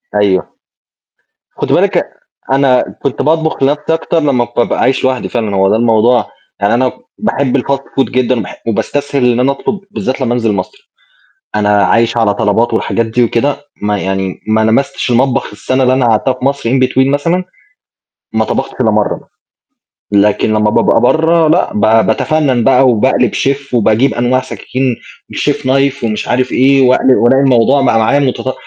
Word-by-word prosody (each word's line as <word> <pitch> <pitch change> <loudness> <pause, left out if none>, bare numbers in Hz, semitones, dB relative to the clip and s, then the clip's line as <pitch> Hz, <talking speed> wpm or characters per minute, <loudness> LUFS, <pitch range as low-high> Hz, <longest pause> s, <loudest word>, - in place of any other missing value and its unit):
أيوه، 100 -3 +1 1.1
خدي - - 0
بالِك - - +1
أن - - +3 0.5
أنا 135 -2 +3 0.2
كنت 135 - -2
باطبخ 160 0 0
لنفسي 150 +3 0
أكتر 165 0 -1
لما 125 -5 0
بابقى 120 - 0
عايش 130 0 +1
لوحدي 130 -1 -1
فعلًا، 110 -5 -2
هو 95 0 +3
ده 105 - +2
الموضوع 120 +1 +2 0.3
يعني 100 +3 +1
أنا 130 +1 +1 0.3
باحب 140 -11 -1
الfast 135 +2 -1
food 135 -1 -3
جدًا 130 0 0
وباح 105 - -8
وباستسهل 135 +3 0
إن 120 - -1
أنا 135 +2 +2
أطلب، 200 +8 -4
بالذات 130 -9 -4
لمّا 120 -2 0
أنزل 115 -3 0
مصر، 410 - -6 0.7
أنا 105 -1 +2
عايش 115 +4 +1
على 105 -3 +2
طلبات 105 +4 0
والحاجات 115 - -1
دي 115 +2 0
وكده، 135 +5 0 0.2
ما 105 0 -1
يعني 95 -1 -3
ما 110 0 +2
لمستش 115 +4 0
المطبخ 125 +2 +1
السنة 130 +5 -2
اللي 130 0 +2
أنا 130 -1 +1
قعدتها 115 +4 +1
في 130 +1 -6
مصر 140 -4 -1
in 125 - 0
between 130 +1 +1
مثلًا، 165 +6 0 0.9
ما - - 0
طبختش - - -3
إلّا - - +3
مرّه - - 0
مثلًا - - -18 0.8
لكن 105 +1 +2
لمّا 105 0 +1
بابقى - - +2
برّه 160 +5 +2
لأ، 170 +4 +1
ب 105 - -1 0.3
باتفنَّن 130 0 0
بقى 135 0 +4
وباقلب 125 0 +1
شيف 140 -1 -2
وباجيب 115 +3 +2
أنواع 125 +2 +1
سكاكين 130 -1 -3 0.4
الchef 145 - 0
knife 135 0 0
ومش 110 -2 -3
عارف 125 +1 0
إيه، 135 +1 +3
وأقل 130 +1 +3
وألاقي 135 +3 +3
الموضوع 135 +1 +3
بقى 115 -3 +2
معايا 125 +6 +2
متطو 130 -1 -1
125 Hz, 170 wpm, -12 LUFS, 115-140 Hz, 1.1 s, بقى